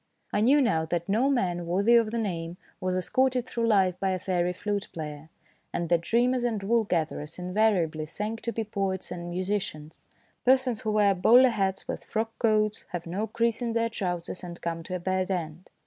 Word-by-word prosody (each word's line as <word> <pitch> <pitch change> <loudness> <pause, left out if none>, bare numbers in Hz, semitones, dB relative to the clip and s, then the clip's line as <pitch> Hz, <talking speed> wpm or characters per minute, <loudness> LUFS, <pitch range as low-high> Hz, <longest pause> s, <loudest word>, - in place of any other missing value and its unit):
I 205 - +2
knew 275 +5 +5
now 165 -10 +2
that 170 +1 -2
no 225 +7 +2
man 175 -10 0
worthy 200 +7 +3
of 230 -2 +4
the 235 - -3
name 175 -6 -3 0.2
was 185 0 -1
escorted 255 +6 +1
through 235 -2 -1
life 190 -4 +3
by 195 - 0
a 185 - 0
fairy 180 -1 0
flute 205 +2 -3
player, 155 -1 -7 0.4
and 170 -1 -2
that 170 -1 +3
dreamers 240 +6 +2
and 220 -4 -1
wool 230 +2 +2
gatherers 160 -4 -2
invariably 180 -5 +1
sank 210 +7 -4
to 235 - -2
be 225 - -2
poets 195 -3 -3
and 175 -1 -5
musicians, 180 -4 -4 0.4
persons 255 -3 +3
who 215 - -1
wear 205 -2 +4
bowler 245 +8 +6
hats 195 -4 -1
with - - -5
frock 225 +1 -2
coats, 215 -2 +1
have 175 -1 -5
no 190 +6 -2
crease 230 +1 0
in 235 -1 -1
their 230 0 +1
trousers, 180 -5 -4
and 175 -1 -7
come 165 -1 -3
to 180 +3 -5
a - - -3
bad 185 +1 -1
end. 170 -2 -4
195 Hz, 195 wpm, -27 LUFS, 175-225 Hz, 0.4 s, bowler